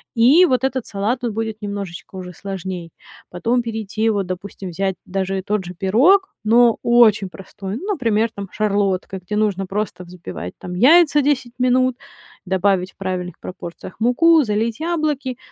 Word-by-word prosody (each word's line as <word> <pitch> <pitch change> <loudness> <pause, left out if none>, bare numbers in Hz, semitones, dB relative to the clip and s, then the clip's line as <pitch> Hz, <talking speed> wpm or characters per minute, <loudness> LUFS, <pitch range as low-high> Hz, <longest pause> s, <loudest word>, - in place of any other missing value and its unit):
И 265 +10 +6
вот 260 -6 +1
этот 260 -2 -1
салат 215 +5 -2
тут 235 -3 -2
будет 220 0 -4
немножечко 200 -3 -6
уже 180 -1 -7
сложней. 185 -3 -6 0.4
Потом 230 +8 0
перейти, 220 -1 -2
вот, 200 -3 -1
допустим, 185 +1 -6
взять 190 +2 -2
даже 190 0 -2
тот 210 -2 -1
же 180 - -7
пирог, 265 - +3
но 230 +1 +5
очень 220 -5 +4
простой, 195 +1 -8
ну, 385 - -7
например, 230 - +1
там, 200 -2 -7
Шарлотка, 200 -2 0
где 185 +4 -5
нужно 205 -3 0
просто 195 -1 -4
взбивать 95 - -8
там 180 - -7
яйца 295 - +6
10 260 -4 0
минут, 255 0 +2 0.5
добавить 190 0 +1
в - - -53
правильных 185 -2 -4
пропорциях 180 0 -9
муку, 310 +7 +4
залить 220 +3 -1
яблоки. 305 -6 -1
210 Hz, 155 wpm, -20 LUFS, 190-245 Hz, 0.5 s, И